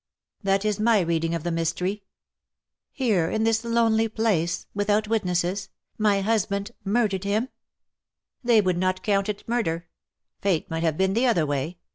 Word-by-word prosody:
" - - -67
That 195 0 +1
is 210 -1 0
my 225 0 +4
reading 165 -1 0
of 165 - -4
the 175 - -1
mystery. 170 +5 -1 0.3
" - - -64
" - - -65
Here 210 -11 +1
in 220 - 0
this 225 0 +2
lonely 230 -1 +2
place 195 -7 0
— - - -48
without 205 +1 +1
witnesses 190 -2 -1
— - - -49
my 200 -1 +2
husband 200 0 0
murdered 200 -2 +1
him 205 +3 +1
V 260 - -9 0.5
" - - -58
They 235 -3 +5
would 185 -3 0
not 185 0 0
count 200 -1 +1
it 205 -1 -5
murder. 175 -8 -1 0.5
Fate 190 -5 0
might 165 0 -2
have 160 -2 0
been 190 0 +2
the 240 +4 +2
other 175 -10 +3
way. 145 +4 -2
200 Hz, 190 wpm, -25 LUFS, 175-220 Hz, 0.5 s, They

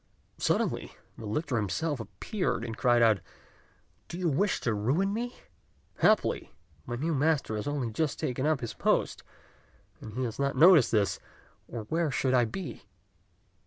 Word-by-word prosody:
Suddenly - - 0 0.2
the 110 - -8
lictor 130 +4 -1
himself 140 - -1
appeared, 115 - -3
and 115 -2 -5
cried 120 0 +3
out, 110 -3 +4 0.9
"Do 170 - -6
you 180 -2 0
wish 190 +7 +1
to 120 - 0
ruin 140 - +1
me? 240 +3 -3 0.6
Happily - - +2 0.4
my 120 - -3
new 160 +7 -1
master 145 -5 +1
has 105 - -4
only 140 -5 -2
just 150 +5 -1
taken 130 +3 -1
up 155 -5 +1
his 115 - -4
post, - - 0 0.8
and 110 - -9
he 130 - -1
has 115 0 -4
not 140 0 0
noticed 165 -5 +7
this, 100 -5 +1 0.5
or 115 - -5
where 160 +8 0
should 130 -1 0
I 125 -2 +4
be?" 130 - -6
130 Hz, 160 wpm, -29 LUFS, 115-160 Hz, 0.9 s, noticed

